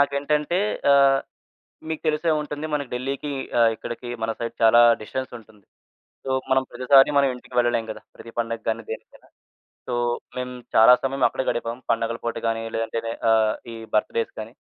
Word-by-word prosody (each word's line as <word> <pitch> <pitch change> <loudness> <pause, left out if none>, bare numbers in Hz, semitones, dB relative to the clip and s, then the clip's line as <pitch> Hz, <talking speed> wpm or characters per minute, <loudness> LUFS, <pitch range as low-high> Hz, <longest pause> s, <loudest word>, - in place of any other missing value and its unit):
నాకేంటంటే 145 +4 +1 0.3
ఆహ్, 135 -1 +5 0.7
మీకు 160 - -4
తెలిసే 155 +2 +1
ఉంటుంది. 150 0 -5
మనకి 145 -3 -3
ఢిల్లీకి 135 +3 -3 0.3
ఆహ్, 115 -1 +6
ఇక్కడికి 120 +2 -7
మన 115 0 0
సైడ్ 115 0 -4
చాలా 115 +1 +7 0.2
డిస్టెన్స్ 130 +4 -5
ఉంటుంది. 105 -3 -20 0.6
సో, 135 - -2 0.2
మనం 130 0 +4
ప్రతిసారి 135 +2 +5
మనం 140 -1 +4
ఇంటికి 125 0 -13
వెళ్ళలేము 120 -2 +1
కదా. - - -9
ప్రతి 115 - -12
పండగ్గాని 115 -1 -2
దేనికైనా. 110 - -9 0.6
సో, 125 - -3 0.4
మేము 125 0 -4 0.2
చాలా 115 +3 +8
సమయం 135 0 0
అక్కడే 130 - -3
గడిపాం. 120 +1 -3
పండగల 115 0 0
పూట 115 - -2
గాని, 115 0 -1
లేదంటే 115 0 -2
నే 115 - -2 0.2
ఆహ్, 110 -1 +3 0.2
ఈ - - -7 0.2
బర్త్‌డేస్ 115 +1 0
గాని, 110 +2 -8
120 Hz, 160 wpm, -23 LUFS, 115-140 Hz, 0.7 s, చాలా